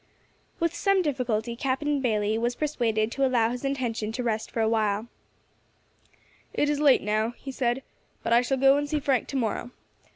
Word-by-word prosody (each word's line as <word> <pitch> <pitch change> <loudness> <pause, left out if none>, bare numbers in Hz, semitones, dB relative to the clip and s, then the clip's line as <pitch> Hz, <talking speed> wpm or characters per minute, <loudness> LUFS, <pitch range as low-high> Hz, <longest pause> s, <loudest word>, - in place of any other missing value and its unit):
With 335 0 +1
some 390 +1 +2
difficulty 240 -6 -1
Captain 275 +3 -1
Bayley 215 -3 +1
was 240 +2 -1
persuaded 230 -7 0
to 275 - -1
allow 240 -3 +3
his 245 +1 -5
intention 245 -6 -2
to 250 +1 -3
rest 220 -2 -1
for - - -4
a 220 - +3
while. 215 -1 0 1.5
"It 295 - +2
is 290 - -1
late 290 -3 +5
now," 215 +3 0
he 270 - -7
said, 255 0 -1 0.4
"but 230 - +1
I 235 - +6
shall 265 +2 0
go 270 +1 +5
and 290 0 -2
see 305 0 0
Frank 270 -4 +1
to - - -6
morrow. 230 0 -2
245 Hz, 185 wpm, -26 LUFS, 225-275 Hz, 1.5 s, I